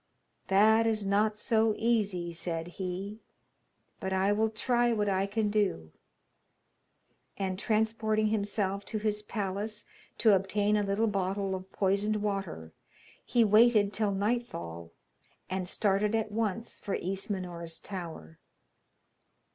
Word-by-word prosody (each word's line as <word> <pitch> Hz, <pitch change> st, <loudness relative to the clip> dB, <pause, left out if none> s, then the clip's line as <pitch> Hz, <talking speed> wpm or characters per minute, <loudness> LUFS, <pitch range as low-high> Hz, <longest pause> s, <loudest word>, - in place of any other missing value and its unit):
'That 220 Hz, +3 st, +5 dB
is 215 Hz, -2 st, 0 dB
not 210 Hz, +2 st, +2 dB
so 220 Hz, -1 st, +2 dB
easy,' 200 Hz, -7 st, 0 dB
said 165 Hz, 0 st, -3 dB
he, 190 Hz, +4 st, -5 dB, 0.8 s
'but 190 Hz, -, -3 dB
I 190 Hz, +1 st, +2 dB
will 220 Hz, +2 st, +2 dB
try 240 Hz, +2 st, +1 dB
what 210 Hz, -2 st, +1 dB
I 195 Hz, 0 st, +1 dB
can 210 Hz, 0 st, 0 dB
do.' 195 Hz, -, 0 dB, 1.5 s
And 190 Hz, -1 st, -2 dB
transporting 215 Hz, 0 st, +1 dB
himself 200 Hz, -2 st, -1 dB
to 220 Hz, -, -3 dB
his 210 Hz, 0 st, -1 dB
palace 210 Hz, +1 st, -3 dB, 0.3 s
to 220 Hz, -3 st, +5 dB
obtain 205 Hz, +2 st, +2 dB
a 210 Hz, -, +2 dB
little 200 Hz, +2 st, +1 dB
bottle 195 Hz, -1 st, -1 dB
of 190 Hz, 0 st, -6 dB
poisoned 200 Hz, +2 st, +1 dB
water, 195 Hz, -, -3 dB, 0.5 s
he 240 Hz, -2 st, +3 dB
waited 215 Hz, -1 st, +5 dB
till 210 Hz, +1 st, +1 dB
nightfall, 195 Hz, -, -3 dB, 0.6 s
and 185 Hz, -1 st, -2 dB
started 205 Hz, +2 st, +1 dB
at 220 Hz, -1 st, -1 dB
once 225 Hz, +1 st, -2 dB
for 200 Hz, -, -3 dB
Ismenor's 180 Hz, -3 st, -4 dB
tower. 165 Hz, -, -8 dB
205 Hz, 125 wpm, -30 LUFS, 190-215 Hz, 1.5 s, That